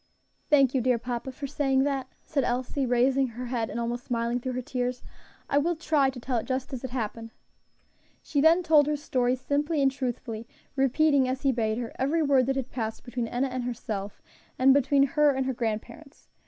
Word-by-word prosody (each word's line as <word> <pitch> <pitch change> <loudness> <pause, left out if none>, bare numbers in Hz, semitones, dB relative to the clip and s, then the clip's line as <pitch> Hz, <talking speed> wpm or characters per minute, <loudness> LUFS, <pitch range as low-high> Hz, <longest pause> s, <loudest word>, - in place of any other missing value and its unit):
"Thank 275 -4 +5
you, 260 - +2
dear 250 0 +2
papa, 245 +2 -4
for 280 +2 -7
saying 270 -1 +1
that," 275 -2 -1 0.2
said 285 -4 -1
Elsie, 255 +2 -1
raising 260 +2 +3
her 245 +1 -7
head 235 -2 -2
and - - -4
almost 240 +1 -3
smiling 235 0 -1
through 255 +1 -4
her 255 - -2
tears. 250 0 -3 0.4
"I 285 - +2
will 340 +4 0
try 305 -4 +2
to 260 -2 -7
tell 245 -1 -1
it - - -7
just 265 +1 -3
as 255 - -5
it 260 - -4
happened." 230 -2 -4 0.9
She 285 - 0
then 330 +4 +5
told 310 -3 +5
her 300 - +1
story 255 -4 0
simply 290 +4 -1
and 270 -1 +3
truthfully, 240 -4 -4 0.3
repeating, 275 0 +3
as 260 +1 -3
he 275 - +4
bade 220 -3 -1
her, 240 -2 -4
every 310 +5 +1
word 270 -3 +3
that 270 - +1
had 265 -1 -3
passed 225 -3 -4
between 245 -1 -3
Enna 250 +3 -1
and 255 0 -3
herself, 215 -4 -5 0.3
and 265 +1 +6
between 275 0 +4
her 300 +1 +3
and 265 0 0
her 265 - -1
grandparents. 235 +6 -5
260 Hz, 205 wpm, -27 LUFS, 245-280 Hz, 0.9 s, and